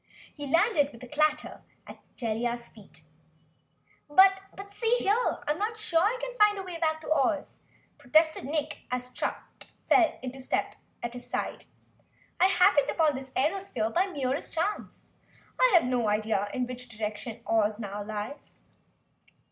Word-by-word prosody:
He 290 -2 -5
landed 330 - +3
with 235 +1 -13
a - - -8
clatter 305 +3 0 0.2
at - - -11 0.2
Jellia's 235 0 -2
feet. 195 -7 -16 1.1
"But 385 +5 +6 0.3
see 455 +3 +1
here! 405 -4 +2
I 480 +3 0
am 305 - -2
not 440 +2 -2
sure 360 -7 +1
I 430 +7 +2
can - - -5
find 420 -1 +5
the 390 - -4
way 355 -3 -7
back 315 -1 0
to 315 - -7
Oz!" 290 0 0 0.4
protested 315 0 +3
Nick 300 +1 -1
Chopper - - -29
as 250 0 -2
Strut - - -2 0.5
fell 335 -4 +4
into 260 +1 -6
step 260 - -1 0.3
at 235 0 -3
his 245 0 -10
side. - - -3 0.7
"I 370 - +6
happened 365 -5 +4
upon 315 -3 +2
this 265 0 -6
airosphere 285 - -1
by 370 +3 +2
the 375 - -10
merest 270 -1 -2
chance, 375 +6 -3 0.5
and - - +5
have 345 - +7
no 245 -2 0
idea 210 -1 0
in 255 - -1
which 250 0 -8
direction 220 +1 -5
Oz 215 -1 +1
now 205 -1 -5
lies." 215 +6 -7
290 Hz, 165 wpm, -28 LUFS, 235-360 Hz, 1.1 s, have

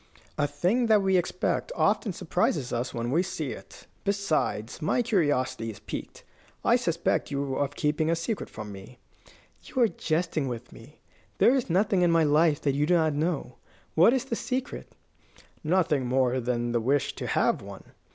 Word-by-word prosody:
"A 145 -1 +1
thing 185 - +1
that 215 -2 +4
we 190 -1 +2
expect 180 - 0
often 210 - +1
surprises 160 -6 -1
us 120 +2 -2
when 120 +1 -3
we 165 +5 +3
see 175 -7 -4
it. - - -11 0.2
Besides, 165 - -1
my 155 +10 +1
curiosity 145 - 0
is 110 - -7
piqued. - - -7 0.4
I - - +5
suspect - - 0
you 140 -1 -2
of 140 0 -1
keeping 150 +1 0
a 165 - +3
secret 170 +6 -3
from 105 -1 -8
me." 100 +5 -11 0.6
"You 260 - -5
are - - +5
jesting 160 -6 -1
with 125 -1 -6
me. 135 +7 -15 0.4
There 245 - +5
is 260 -7 0
nothing 190 +2 +2
in 175 - +4
my 165 -1 +4
life 150 0 +3
that 140 - +1
you 145 +2 +1
do 175 - +4
not 160 -3 +2
know. 150 -4 -2 0.4
What 175 +8 +6
is 260 0 0
the 240 - -2
secret?" 255 +3 -4 0.7
"Nothing 155 -6 +1
more 130 0 +2
than 120 -1 -1
the 120 -1 +1
wish 140 +3 +1
to - - -4
have - - +1
one. - - -10
155 Hz, 180 wpm, -27 LUFS, 130-185 Hz, 0.7 s, What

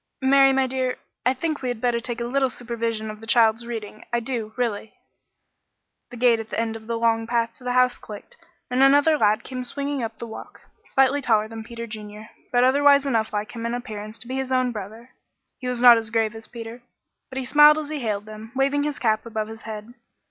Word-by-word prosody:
"Mary, 270 0 +6
my 265 0 +2
dear, 255 -1 -2 0.3
I 255 - +3
think 310 +2 -3
we'd 245 -3 -3
better 240 0 +1
take 235 0 -5
a - - -2
little 265 +2 +1
supervision 230 -2 -3
of 215 - -11
the 225 - -12
child's 230 0 +3
reading 215 -3 -6
I 240 - +1
do, 230 -3 -4
really." 225 -4 -3 1.1
The 245 - -10
gate 235 -1 +4
at 225 - -6
the - - -3
end 225 -1 -1
of 220 -1 -10
the 230 0 -1
long 225 -1 +1
path 235 -1 0
to 260 - -17
the 250 0 -1
house 250 0 +3
clicked, 210 -1 -11 0.4
and 250 +1 +2
another 285 +3 +5
lad 215 -4 +2
came 255 -1 -5
swinging 280 +2 -3
up 225 - -5
the - - -6
walk, 220 - -10 0.2
slightly 270 +2 +2
taller 220 -4 +2
than 225 0 -8
Peter 235 +1 -7
Junior, 215 0 -9 0.2
but 245 0 +3
otherwise 280 +2 +5
enough 225 -5 0
like 210 0 -3
him 230 -1 -7
in 235 +1 -1
appearance 215 -3 -7
to - - -10
be 260 +1 -3
his 265 -1 -3
own 255 -1 +2
brother. 220 +3 -8 0.5
He 255 - -5
was 250 -1 -2
not 240 -2 +9
as 225 -1 -6
grave 225 -1 0
as 225 0 -10
Peter, 235 0 -9 0.5
but 265 - -8
smiled 295 +3 +7
as 305 -2 -4
he 305 -1 -3
hailed 210 -4 -2
them, 215 +2 -10
waving 275 +2 +2
his 295 -1 -2
cap 220 -1 0
above 220 -1 -3
his 225 0 -9
head. 215 +2 -7
235 Hz, 220 wpm, -24 LUFS, 220-260 Hz, 1.1 s, not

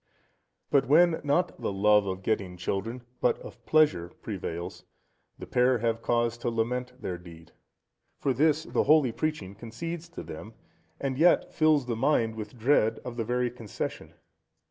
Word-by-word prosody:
But 140 -2 +3
when, 165 +3 +5
not 160 +5 0
the - - -1
love 105 +1 +4
of 95 0 -4
getting 95 -5 -1
children, 105 +7 -3 0.2
but 125 - +2
of 120 - -12
pleasure 150 - +3
prevails, 85 -5 -5 0.5
the - - -8
pair 125 +1 +3
have 115 0 -1
cause 120 0 0
to 120 - -1
lament 125 +2 -2
their 90 -7 -4
deed. 85 -2 -14 0.7
For 135 - 0
this 155 +4 +2
the - - 0
holy 150 -4 +5
preaching 115 -9 -3
concedes 160 +11 -6
to - - -8
them, - - -9 0.4
and 135 -1 -2
yet 175 +2 +4
fills 155 -4 +3
the 120 -2 -2
mind 115 -2 +2
with 110 +3 -8
dread 110 -2 +2
of 125 - -5
the 115 - -1
very 125 +1 0
concession. 115 -5 -6
120 Hz, 160 wpm, -28 LUFS, 105-145 Hz, 0.7 s, when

